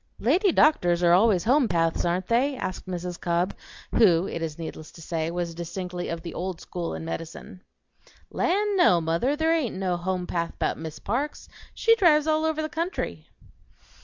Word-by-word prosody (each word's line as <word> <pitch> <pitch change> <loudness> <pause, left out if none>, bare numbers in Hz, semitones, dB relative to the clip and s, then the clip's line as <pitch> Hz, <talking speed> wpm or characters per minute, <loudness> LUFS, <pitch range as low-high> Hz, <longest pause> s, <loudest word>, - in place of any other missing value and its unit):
"Lady 350 - +3
doctors 180 - +3
are 170 0 +5
always 190 -1 +4
home'paths, 195 - +2
ain't 175 +2 0
they?" 255 +6 +1
asked 185 - -5
Mrs. 180 -1 -5
Cobb, 175 +2 0 0.4
who, 185 -5 +4
it 165 - -5
is 160 -2 -4
needless 160 -1 -7
to - - -14
say, 165 -1 -3
was 170 0 -3
distinctly 175 +1 -5
of 165 0 -4
the 170 - -6
old 180 -1 -4
school 175 -2 -5
in - - -6
medicine. 165 +2 -7 0.7
"Land, 405 +3 +1
no, 265 - +5
mother; 165 - 0
there 320 +2 +2
ain't 305 -8 -1
no 185 -2 -1
home'path 180 -1 -3
'bout - - -1
Miss 160 -1 -7
Parks 275 +8 -3 0.3
she 455 0 +4
drives 305 -7 +4
all 315 0 +1
over 315 -1 0
the - - -1
country." 335 +4 -4
180 Hz, 170 wpm, -26 LUFS, -, 0.7 s, are